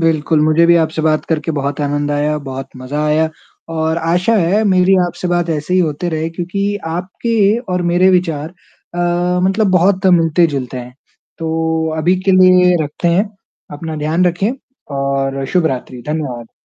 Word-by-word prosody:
बिल्कुल, 160 -1 +1
मुझे 155 +2 +3
भी 170 0 +5
आपसे 160 -1 0
बात 155 -1 +1
करके 160 0 -1
बहुत 140 0 -3
आनंद 145 0 -1
आया, 150 +1 0
बहुत 135 -1 -7
मज़ा 140 +4 -3
आया 155 +1 +2 0.4
और 160 0 0
आशा 175 +7 +1
है 195 +3 +2
मेरी 190 -1 +4
आपसे 175 +1 -5
बात 175 -1 0
ऐसे 155 +3 -2
ही 185 - +4
होते 160 +1 -1
रहे 160 0 -2
क्योंकि 195 +4 -2
आपके 200 +6 0
और 180 0 0
मेरे 180 +2 +4
विचार 165 -4 0 0.5
अ, 175 +1 0
मतलब 195 +3 +2
बहुत 185 +1 +2
मिलते-जुलते 160 -7 +2
हैं। 125 0 -9 0.4
तो 160 0 -1
अभी 175 +4 +2
के 195 - +2
लिए 185 -1 +5
रखते 150 +4 -2
हैं, 190 +5 +2 0.4
अपना 155 +2 -6
ध्यान 155 +4 0
रखें 180 +5 0 0.5
और 135 0 -1
शुभ 180 -3 +3
रात्रि। 125 -2 -4
धन्यवाद। 130 -7 -4
165 Hz, 160 wpm, -16 LUFS, 150-180 Hz, 0.5 s, भी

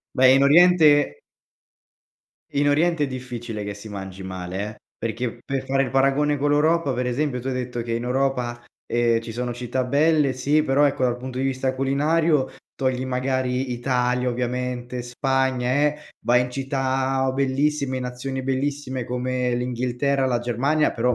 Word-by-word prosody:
Beh, 130 0 +6
in 135 - +4
oriente 150 - +5 1.3
in 145 +1 +1
oriente 160 +1 +2
è - - -1
difficile 120 -4 -6
che 105 0 -5
si 105 +2 -10
mangi 95 -1 -7
male, 95 0 -5
eh, 110 - -13 0.2
perché 115 +1 -3
per 135 -2 -3
fare 135 0 +2
il 130 - -3
paragone 140 +2 +2
con 145 +1 +1
l'Europa 150 -1 +2
per 125 - -1
esempio, 125 +1 -1
tu 135 - -4
hai - - -1
detto 125 -2 -3
che 115 0 -4
in 115 +1 -2
Europa, 125 -2 -1 0.2
ehm, 120 -1 +2
ci 115 -1 -8
sono 120 +1 -3
città 125 +1 -2
belle, 145 +1 +3
sì 145 +4 +2
però 140 +1 +3
ecco 135 -2 -1
dal 120 0 0
punto 130 0 -7
di 135 - 0
vista 130 0 -1
culinario, 145 +2 +2 0.3
togli 130 -1 -1
magari 130 0 -1
Italia, 125 0 0
ovviamente 125 0 -3
Spagna, 130 0 0
eh, 150 +2 +2 0.3
vai 125 +1 +4
in 125 - -4
città 135 0 -1
o 130 - -1
bellissime 140 0 0
in - - -4
nazioni 130 +2 -4
bellissime 135 -1 -2
come 125 0 -1
l'Inghilterra, 125 +3 -1
la 125 -2 +1
Germania 130 +6 +1
però 125 +1 +1
130 Hz, 165 wpm, -23 LUFS, 125-140 Hz, 1.3 s, Beh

